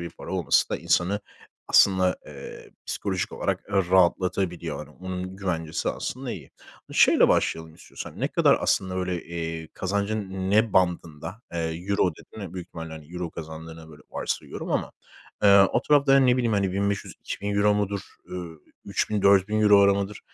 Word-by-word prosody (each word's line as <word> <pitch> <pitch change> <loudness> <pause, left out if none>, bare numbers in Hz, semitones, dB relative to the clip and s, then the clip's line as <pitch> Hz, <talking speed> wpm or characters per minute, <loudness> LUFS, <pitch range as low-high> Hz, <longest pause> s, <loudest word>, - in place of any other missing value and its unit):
bir 85 -1 -5
para - - -10
olması 85 -7 +2
da - - 0
insanı 100 +4 +1 0.5
aslında, 95 -2 +4
eee, - - -10 0.2
psikolojik 95 -3 -2
olarak, - - -1
eee, 100 - -5 0.2
rahatlatabiliyor. 90 -1 +1
Hani - - -9
onun 95 0 -5
güvencesi 80 -5 -2
aslında 130 -1 -4
iyi. 75 -8 -9 0.4
E, - - -9
şeyle - - +5
başlayalım 80 -1 0
istiyorsan. - - -10
Ne - - +1
kadar - - +4
aslında 95 -1 0
böyle, 90 -2 -2
eee, 80 -1 -5
kazancın 100 -1 -2
ne 110 +1 +3
bandında, 85 +2 -1
eee, 85 - -3 0.3
"euro" 100 -2 +2
dedin 110 - -13
ve 95 0 -9
büyük 90 -2 -6
ihtimalle 80 -2 -8
euro 90 -2 -4
kazandığına 80 0 -9
böyle 75 -2 -15
varsayıyorum - - -4
ama, - - -1 0.5
eee, 100 -1 +8
o 120 - +1
tarafta 140 -2 +4
hani, 135 -1 +5
ne 125 0 +4
bileyim, 120 -3 +1
hani, 100 -2 +1
1.500-€2.000 100 +1 -1
mudur, 100 -1 -1 0.3
ııı, 85 -3 -7 0.3
3.000-€4.000'lar 100 0 +4
mıdır? 100 +1 -7
95 Hz, 150 wpm, -25 LUFS, 85-100 Hz, 0.5 s, eee